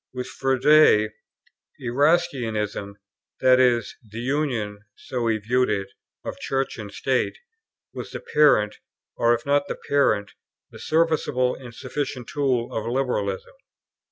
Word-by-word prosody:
With 125 0 -3
Froude, 135 -5 +4 0.7
Erastianism, 120 - 0 0.4
that 130 0 +5
is, 120 -2 +2
the 110 0 -12
union 120 -6 -1 0.2
(so 125 -3 -3
he 110 -1 +2
viewed 125 +4 +1
it) 100 -2 -1 0.4
of - - -5
Church 135 -2 -2
and 105 -2 -7
State, 130 +5 -1 0.6
was - - -6
the - - -6
parent, 105 -9 +3 0.4
or 120 0 +3
if - - -8
not 145 0 +2
the - - -3
parent, 110 -8 +2 0.4
the - - -12
serviceable 155 -6 +1
and 125 -2 -10
sufficient 130 -1 -4
tool, 130 -5 0
of 110 0 -3
liberalism. 120 -7 -2
125 Hz, 130 wpm, -24 LUFS, 110-140 Hz, 0.7 s, that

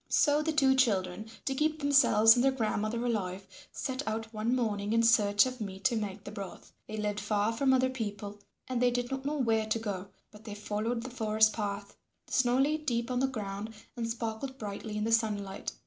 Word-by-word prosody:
So 295 0 +3
the 320 +1 0
two 275 -3 +4
children, 215 -5 +1 0.2
to 270 - 0
keep 305 +3 0
themselves 270 -7 +6
and 245 - +2
their 270 - +4
grandmother 230 -1 -1
alive, 195 -5 -2 0.3
set 260 -1 -3
out 225 +1 -3
one 220 +3 0
morning 210 -4 -1
in 230 0 +3
search 205 -2 +5
of 255 -2 -5
meat 195 -2 -6
to 255 -3 +3
make 205 -2 -4
the 205 - -8
broth. 200 -3 -9
They 215 - -6
lived 210 -1 -1
far 210 +1 0
from 265 +4 +2
other 260 0 +3
people 205 -4 -5 0.3
and 250 -2 -2
they 250 - +5
did 245 0 -2
not 270 0 -4
know 300 +1 -1
where 225 -4 +1
to 220 - +1
go, 200 -4 -4 0.2
but 210 0 -15
they 210 -2 -7
followed 215 +3 -2
the 255 - -7
forest 220 -2 +3
path. 200 -1 -4 0.3
The - - -11
snow 250 -1 +3
lay 290 +3 +2
deep 245 -5 -2
on 250 - 0
the 265 - +2
ground 215 -3 -5 0.2
and 230 -2 -3
sparkled 230 +3 -4
brightly 210 0 -5
in 210 - -1
the 225 - -1
sunlight. 210 -4 0
225 Hz, 210 wpm, -30 LUFS, 210-255 Hz, 0.3 s, themselves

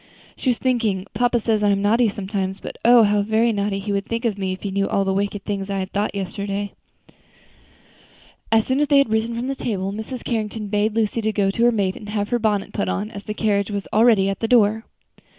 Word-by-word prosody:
She 260 - -1
was 240 - +2
thinking, 225 -7 0
"Papa 245 0 +2
says 220 -1 0
I 205 - +3
am 200 0 +1
naughty 225 +3 +3
sometimes, 195 -1 -3
but - - -8
oh! 235 0 +7
how 205 0 +3
very 220 +3 +2
naughty 200 -1 -1
he 200 +1 -4
would 200 0 -1
think 230 +1 -3
me 190 -2 -2
if 185 - -6
he 200 - -3
knew 195 +1 0
all 195 - +1
the 190 - 0
wicked 200 +1 -2
feelings 200 -1 -3
I 200 - -1
had 190 -1 -3 0.2
yesterday." 200 +1 -4 1.8
As 225 -1 +4
soon 260 +1 0
as 295 - +2
they 285 0 +4
had 275 -5 +3
risen 220 +1 0
from 235 +2 -3
the 275 - -1
table, 195 -7 -3
Mrs. 220 +4 -6
Carrington 215 -2 -3
bade 210 +1 0
Lucy 225 0 0
go 200 -2 +1
up - - -2
to 235 - +2
her 240 - +5
maid 200 -3 -1
to 205 - -7
have 205 -1 -1
her 240 - +1
bonnet 210 -3 0
put 205 - -1
on, 210 +3 -2
as 200 -3 -9
the 210 - -4
carriage 200 -2 0
was 200 -2 -4
already 220 -3 +5
at 195 - -2
the 225 - -1
door. 220 -2 +3
210 Hz, 235 wpm, -22 LUFS, 200-230 Hz, 1.8 s, oh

